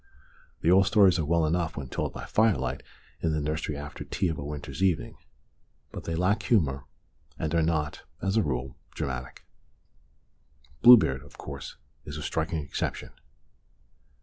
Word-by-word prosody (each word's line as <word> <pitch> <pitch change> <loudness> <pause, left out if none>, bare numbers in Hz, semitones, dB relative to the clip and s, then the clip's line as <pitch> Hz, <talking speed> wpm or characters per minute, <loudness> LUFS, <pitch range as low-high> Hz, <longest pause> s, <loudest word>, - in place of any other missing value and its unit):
The 85 - +3
old 95 +1 +6
stories 95 -4 +5
are 80 - 0
well 85 +1 +2
enough 85 +1 -1
when 70 -2 -4
told - - -3
by - - -7
firelight 100 - +1 0.4
in 80 -2 +1
the 75 - 0
nursery 75 0 -2
after 75 0 -7
tea 95 -2 -1
of 80 - -3
a - - -4
winter's 75 +1 -6
evening. 90 -5 +1 0.8
But - - -8
they 85 - -2
lack 95 +5 +1
humour, 75 - +1 0.5
and 80 0 -2
are 85 - +3
not, 80 -2 -1 0.2
as 95 +2 -1
a 110 - +4
rule, 65 -5 -3 0.2
dramatic. 65 -1 -5 0.7
(" 70 +1 -34
Bluebeard," 105 - +7
of 70 - -16
course, 70 -1 -8 0.3
is 75 0 -7
a 75 - -5
striking 80 0 -2
exception.) 70 - -4
80 Hz, 160 wpm, -28 LUFS, 70-90 Hz, 0.8 s, Bluebeard